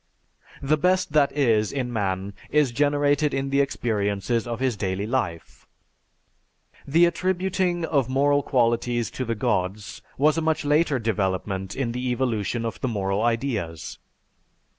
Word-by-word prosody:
"_) -, -, -5 dB
The 155 Hz, +2 st, +3 dB
best 185 Hz, -1 st, +1 dB
that 145 Hz, -2 st, +4 dB
is 115 Hz, -7 st, +2 dB
in 125 Hz, -3 st, -3 dB
man 100 Hz, -2 st, -2 dB, 0.2 s
is 150 Hz, -4 st, +2 dB
generated 145 Hz, +2 st, +2 dB
in 135 Hz, 0 st, -2 dB
the 140 Hz, 0 st, +3 dB
experiences 115 Hz, -3 st, -1 dB
of 120 Hz, -1 st, -4 dB
his 130 Hz, -3 st, 0 dB
daily 95 Hz, 0 st, -2 dB
life. 110 Hz, -8 st, -3 dB, 1.2 s
The 165 Hz, +5 st, +5 dB
attributing 185 Hz, -1 st, 0 dB
of 140 Hz, -6 st, 0 dB
moral 145 Hz, +2 st, +3 dB
qualities 120 Hz, -2 st, 0 dB
to 130 Hz, -, -4 dB
the 115 Hz, 0 st, -2 dB
gods 100 Hz, -3 st, -2 dB, 0.2 s
was 150 Hz, +3 st, +3 dB
a -, -, -2 dB
much 160 Hz, -1 st, 0 dB
later 150 Hz, -1 st, +2 dB
development 95 Hz, -3 st, -2 dB
in 130 Hz, -4 st, -1 dB
the 125 Hz, +1 st, -3 dB
evolution 120 Hz, -2 st, -1 dB
of 115 Hz, -, -5 dB
the 130 Hz, -, 0 dB
moral 100 Hz, -3 st, -1 dB
ideas. 115 Hz, -, -2 dB
125 Hz, 145 wpm, -24 LUFS, 105-145 Hz, 1.2 s, The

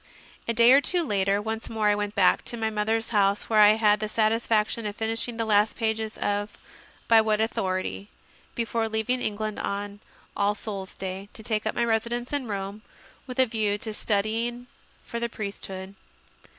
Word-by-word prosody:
A 230 Hz, -, +1 dB
day 235 Hz, +2 st, +7 dB
or 275 Hz, +2 st, +7 dB
two 350 Hz, +3 st, +2 dB
later, 200 Hz, -6 st, +1 dB
once 220 Hz, +1 st, -4 dB
more 220 Hz, -2 st, 0 dB
I -, -, +4 dB
went 205 Hz, 0 st, -3 dB
back 190 Hz, -2 st, +4 dB
to 240 Hz, -, -3 dB
my 220 Hz, -1 st, -1 dB
mother 215 Hz, +1 st, +1 dB
s 225 Hz, -, -5 dB
house, 200 Hz, -2 st, +2 dB
where 215 Hz, -, +5 dB
I 210 Hz, 0 st, +8 dB
had 210 Hz, -1 st, +3 dB
the 215 Hz, 0 st, -3 dB
satisfaction 220 Hz, 0 st, +1 dB
of 205 Hz, -, -5 dB
finishing 225 Hz, +2 st, -1 dB
the 225 Hz, -, -1 dB
last 210 Hz, 0 st, +3 dB
pages 220 Hz, -1 st, -2 dB
of 205 Hz, +1 st, -2 dB, 0.5 s
"By 225 Hz, -1 st, +7 dB
What 215 Hz, -1 st, +1 dB
Authority?" 195 Hz, -2 st, -2 dB, 0.5 s
before 230 Hz, -1 st, -1 dB
leaving 220 Hz, +3 st, 0 dB
England, 215 Hz, -1 st, -2 dB
on 205 Hz, 0 st, -4 dB, 0.4 s
All 205 Hz, +1 st, +1 dB
Souls 195 Hz, -3 st, -7 dB
Day, 190 Hz, +1 st, -6 dB
to 220 Hz, -, -9 dB
take 215 Hz, -1 st, -1 dB
up -, -, -1 dB
my 235 Hz, -, +1 dB
residence 235 Hz, +3 st, -1 dB
in 280 Hz, -4 st, -1 dB
Rome 200 Hz, 0 st, -4 dB, 0.5 s
with 250 Hz, -, -7 dB
a 260 Hz, -, +6 dB
view 215 Hz, -3 st, 0 dB
to 215 Hz, +1 st, -5 dB
studying 225 Hz, +4 st, -1 dB, 0.4 s
for 235 Hz, -, -4 dB
the 235 Hz, 0 st, -2 dB
priesthood. 195 Hz, -3 st, -6 dB
215 Hz, 185 wpm, -26 LUFS, 205-225 Hz, 0.5 s, I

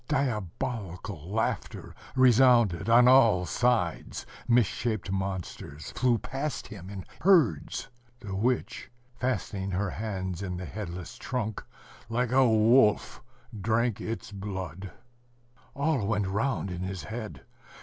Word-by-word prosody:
Diabolical 105 Hz, -, -3 dB
laughter 110 Hz, +1 st, -2 dB, 0.2 s
resounded 120 Hz, -6 st, +5 dB
on 120 Hz, +2 st, +7 dB
all 115 Hz, -9 st, +6 dB
sides. 115 Hz, -7 st, 0 dB, 0.2 s
Misshaped 115 Hz, -3 st, +1 dB
monsters 95 Hz, -6 st, -4 dB
flew 125 Hz, -2 st, +2 dB
past 135 Hz, +5 st, -4 dB
him 95 Hz, -4 st, -9 dB
in 100 Hz, -2 st, -7 dB, 0.2 s
herds. 160 Hz, -, +3 dB, 0.3 s
The 100 Hz, -5 st, -6 dB
witch, 120 Hz, +5 st, -1 dB, 0.2 s
fastening 105 Hz, -6 st, -2 dB
her 95 Hz, 0 st, -1 dB
hands 95 Hz, -4 st, -4 dB
in 90 Hz, -2 st, -4 dB
the 90 Hz, -, -5 dB
headless 90 Hz, -4 st, -7 dB
trunk, 110 Hz, -4 st, -3 dB, 0.5 s
like 120 Hz, +1 st, 0 dB
a 130 Hz, -1 st, +5 dB
wolf 110 Hz, 0 st, +4 dB, 0.3 s
drank 110 Hz, +2 st, 0 dB
its 115 Hz, -1 st, -5 dB
blood.... 95 Hz, -2 st, -6 dB, 0.9 s
All 140 Hz, -7 st, 0 dB
went 105 Hz, -2 st, +1 dB
round 100 Hz, -, -1 dB
in 90 Hz, 0 st, -5 dB
his 95 Hz, 0 st, -4 dB
head. 110 Hz, -1 st, -7 dB
105 Hz, 115 wpm, -28 LUFS, 95-125 Hz, 0.9 s, on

